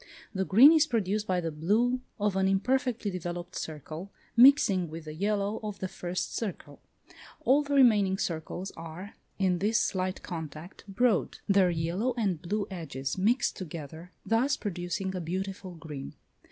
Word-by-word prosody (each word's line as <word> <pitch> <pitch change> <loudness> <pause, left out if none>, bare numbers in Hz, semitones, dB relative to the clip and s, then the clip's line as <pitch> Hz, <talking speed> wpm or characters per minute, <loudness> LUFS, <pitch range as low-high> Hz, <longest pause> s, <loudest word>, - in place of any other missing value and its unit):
The 190 -1 -1
green 240 +11 +8
is 315 -1 +4
produced 215 -4 -1
by 180 -1 +1
the 165 -1 -3
blue 220 +11 +1 0.2
of 205 -1 +1
an 190 0 +2
imperfectly 240 +2 0
developed 175 0 -5
circle, 160 +5 -6 0.2
mixing 235 - +6
with 160 +1 -8
the 155 - -6
yellow 205 +4 -1
of 210 -2 -5
the 190 - -3
first 180 0 -4
circle. 215 -6 -5 0.6
All 275 +3 +4
the 285 -1 -2
remaining 210 -8 +5
circles 175 +2 -4
are, 165 +4 -9 0.2
in 185 -3 +1
this 215 +4 +2
slight 185 -1 -1
contact, 160 +1 -7
broad; 210 +1 +1
their 195 -2 +4
yellow 175 +9 -1
and 195 -8 0
blue 205 +3 -2
edges 160 -4 -4
mix 240 +6 +2
together, 165 0 -8
thus 250 +5 +2
producing 185 -1 -3
a 180 - -3
beautiful 185 +2 -4
green. 150 -4 -8
190 Hz, 155 wpm, -29 LUFS, 170-215 Hz, 0.6 s, green